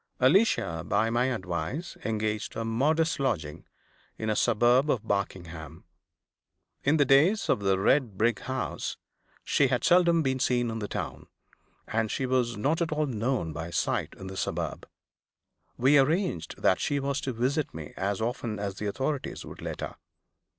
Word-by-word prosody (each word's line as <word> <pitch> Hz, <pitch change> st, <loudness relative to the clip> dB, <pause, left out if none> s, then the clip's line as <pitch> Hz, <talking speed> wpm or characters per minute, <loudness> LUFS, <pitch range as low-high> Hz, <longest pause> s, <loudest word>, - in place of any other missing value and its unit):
Alicia, 130 Hz, -, +3 dB
by 110 Hz, +6 st, +1 dB
my 120 Hz, +2 st, +2 dB
advice, 100 Hz, -, -3 dB
engaged 110 Hz, -1 st, -2 dB
a 115 Hz, -, -2 dB
modest 150 Hz, +9 st, +1 dB
lodging 85 Hz, -, -2 dB, 0.5 s
in 110 Hz, 0 st, -1 dB
a -, -, 0 dB
suburb 120 Hz, +6 st, +3 dB
of 120 Hz, -7 st, +1 dB
Barkingham. 85 Hz, -5 st, -4 dB, 1.0 s
In 150 Hz, +3 st, +3 dB
the 145 Hz, -, +4 dB
days 155 Hz, -, +4 dB
of -, -, +3 dB
the 95 Hz, -1 st, +2 dB
red 110 Hz, +1 st, +2 dB
brick 115 Hz, +1 st, +2 dB
house, 130 Hz, 0 st, -3 dB, 0.5 s
she 140 Hz, -, +3 dB
had 125 Hz, -1 st, 0 dB
seldom 170 Hz, -2 st, +5 dB
been 130 Hz, -1 st, 0 dB
seen 120 Hz, -2 st, +1 dB
in 115 Hz, -, -4 dB
the 105 Hz, -, -3 dB
town, -, -, -5 dB, 0.6 s
and 110 Hz, 0 st, 0 dB
she 130 Hz, -, -1 dB
was 125 Hz, -3 st, +1 dB
not 150 Hz, +10 st, 0 dB
at 165 Hz, -, 0 dB
all 155 Hz, 0 st, +1 dB
known 120 Hz, -, -1 dB
by 80 Hz, +2 st, -5 dB
sight -, -, -1 dB
in -, -, -9 dB
the 95 Hz, 0 st, -7 dB
suburb. -, -, -3 dB, 0.9 s
We 140 Hz, +4 st, +5 dB
arranged 135 Hz, -, 0 dB
that -, -, +4 dB
she 145 Hz, -, 0 dB
was 140 Hz, +1 st, -1 dB
to 135 Hz, -, -2 dB
visit 130 Hz, +6 st, 0 dB
me 75 Hz, -1 st, -8 dB
as 100 Hz, +2 st, -2 dB
often 115 Hz, -1 st, -2 dB
as 100 Hz, -1 st, -4 dB
the 105 Hz, -, -3 dB
authorities 135 Hz, +6 st, -3 dB
would -, -, -10 dB
let -, -, -5 dB
her. -, -, -5 dB
120 Hz, 165 wpm, -28 LUFS, 100-140 Hz, 1.0 s, seldom